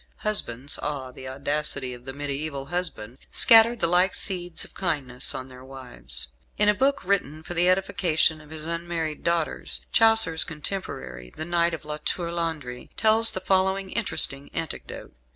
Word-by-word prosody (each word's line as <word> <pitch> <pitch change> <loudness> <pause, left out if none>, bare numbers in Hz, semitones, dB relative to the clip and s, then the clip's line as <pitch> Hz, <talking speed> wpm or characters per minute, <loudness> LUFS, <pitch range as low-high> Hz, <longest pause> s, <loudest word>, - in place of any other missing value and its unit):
Husbands 140 - +1
(ah, 140 -3 -4
the 130 +1 -10
audacity 140 -1 -2
of 120 0 -12
the 135 - -5
mediaeval 140 0 -4
husband) 140 -8 -3
scattered 230 +1 +6
the - - +4
like 180 +2 +3
seeds 175 -3 -1
of - - -18
kindness 140 -9 -1
on 130 - -6
their 130 -1 -13
wives. 125 - -5 0.3
In 210 - +3
a 210 - +6
book 275 +4 +1
written 160 -5 -1
for 175 - -6
the 175 +1 +3
edification 180 -4 +2
of 150 - -17
his 155 -1 -6
unmarried 165 -2 -3
daughters, 170 -2 0
Chaucer's 225 -8 +5
contemporary, 65 - -6
the 160 - -4
Knight 170 0 +1
of 155 - -13
La 150 0 -4
Tour 170 +2 -2
Landry, 155 -8 -4
tells 220 +1 +4
the 185 - -3
following 190 0 +1
interesting 140 -10 0
anecdote. 160 - -6
160 Hz, 160 wpm, -25 LUFS, 135-185 Hz, 0.3 s, scattered